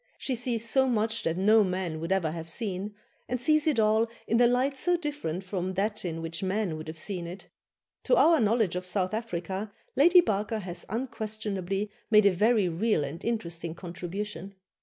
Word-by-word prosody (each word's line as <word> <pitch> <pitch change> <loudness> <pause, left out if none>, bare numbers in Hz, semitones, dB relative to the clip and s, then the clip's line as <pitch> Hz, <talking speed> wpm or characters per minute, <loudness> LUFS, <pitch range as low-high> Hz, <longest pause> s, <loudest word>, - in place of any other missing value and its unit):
She 265 - -2
sees 235 -2 -1
so 265 +3 +3
much 225 -1 +1
that 165 +1 -1
no 215 +3 +5
man 180 -4 -2
would 165 +3 -4
ever 185 -5 +1
have 165 0 -7
seen, 200 +2 -3 0.3
and 250 - -1
sees 305 +4 +4
it 300 -6 +2
all 220 +1 +3 0.2
in 230 +2 +2
a 240 - +7
light 255 +3 +1
so 350 +6 +2
different 290 - -4
from 185 -1 -3
that 210 +3 -1
in 165 -2 -4
which 165 0 -4
men 190 -2 -1
would 155 0 -8
have 160 +1 -7
seen 175 +1 -3
it. 180 +3 -9 0.6
To - - +4
our 330 -6 +5
knowledge 220 -4 +2
of 180 - -2
South 185 +1 -1
Africa, 200 -2 -4 0.2
Lady 345 +6 +7
Barker 215 - 0
has 180 -4 -5
unquestionably 210 -4 -3 0.2
made 215 -2 +6
a 200 - +6
very 210 +2 +3
real 175 0 +1
and 145 +4 -6
interesting 170 -8 -3
contribution. 185 +2 -6
205 Hz, 185 wpm, -28 LUFS, 180-230 Hz, 0.6 s, a